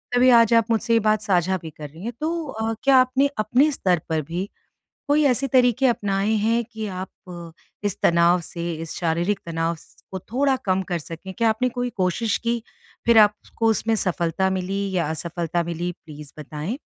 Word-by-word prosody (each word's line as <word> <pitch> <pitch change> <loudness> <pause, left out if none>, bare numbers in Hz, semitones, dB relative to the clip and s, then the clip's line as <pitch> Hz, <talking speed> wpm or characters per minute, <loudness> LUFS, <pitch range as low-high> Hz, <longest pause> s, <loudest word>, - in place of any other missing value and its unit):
तभी 250 +1 +5
आज 235 -2 +6
आप 230 -1 +5
मुझसे 230 +1 +1
ये 230 - +5
बात 215 -1 +2
साझा 190 -2 +1
भी 160 - -7
कर 150 -1 -10
रही 160 +5 -13
हैं। 235 +2 -4
तो 330 +1 -2
अ, 225 -3 -3
क्या 275 -1 +5
आपने 255 +2 +3
अपने 245 +8 +3
स्तर 185 - +1
पर 160 -1 0
भी 175 +7 -5 0.6
कोई 295 +1 +3
ऐसे 260 0 +2
तरीके 250 0 +3
अपनाए 205 -3 0
हैं 230 +2 +1
कि 220 -1 -7
आप 185 0 -5 0.2
अ, 170 -2 -8 0.4
इस 200 - -2
तनाव 170 +1 +4
से, 170 +1 -5
इस 160 0 -7
शारीरिक 175 +4 0
तनाव 165 0 -1
स - - -19 0.2
को 190 - -2
थोड़ा 270 +2 +2
कम 190 -1 +1
कर 175 -2 -1
सकें। 165 +4 -9
क्या 230 +2 +2
आपने 220 +3 +1
कोई 245 0 -3
कोशिश 200 +4 0
की 235 0 -1 0.5
फ़िर 230 -1 +6
आपको 210 +2 +2
उसमें 225 +1 +1
सफलता 180 -1 0
मिली 190 +1 -2 0.2
या 170 -4 +1
असफलता 170 +1 -2
मिली, 170 +1 -3
प्लीज़ 150 -3 -13
बताएँ। 150 - -5
195 Hz, 190 wpm, -23 LUFS, 170-235 Hz, 0.6 s, आज